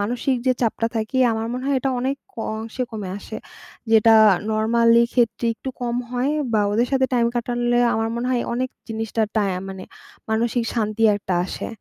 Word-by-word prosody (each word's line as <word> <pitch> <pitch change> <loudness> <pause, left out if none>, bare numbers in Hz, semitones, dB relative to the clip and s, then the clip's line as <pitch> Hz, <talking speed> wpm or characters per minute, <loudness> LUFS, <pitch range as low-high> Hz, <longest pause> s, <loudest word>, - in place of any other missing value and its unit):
মানসিক 245 +5 0
যে, 255 - +5
চাপটা 230 0 0
থাকি 220 +3 -2 0.2
আমার 220 0 -2
মনে 255 +1 -4
হয়, 275 - +2
এটা 270 +1 0
অনেক 265 +2 -1 0.2
ক - - -32 0.2
অংশে 225 +3 -5
কমে 210 -4 -5
আসে। - - -8 0.5
যেটা 225 0 +6 0.4
নরমালি 230 +2 +4
ক্ষেত্রে 235 -2 +1
একটু 265 - -8
কম 240 -1 -2
হয় 250 +3 0 0.2
বা 215 - +3
ওদের 235 +4 +2
সাথে 260 -1 +3
টাইম 235 -1 +3
কাটালে 240 0 0 0.2
আমার 225 0 0
মনে 235 +1 -2
হয় 245 -2 +1
অনেক 255 +1 -1 0.2
জিনিসটার 225 0 -1
টায়া 195 -4 +1
মানে 190 -1 -7 0.5
মানসিক 230 +2 0
শান্তি 215 -1 -1
একটা 190 -3 -3
আসে। - - -5
230 Hz, 180 wpm, -22 LUFS, 220-245 Hz, 0.5 s, যেটা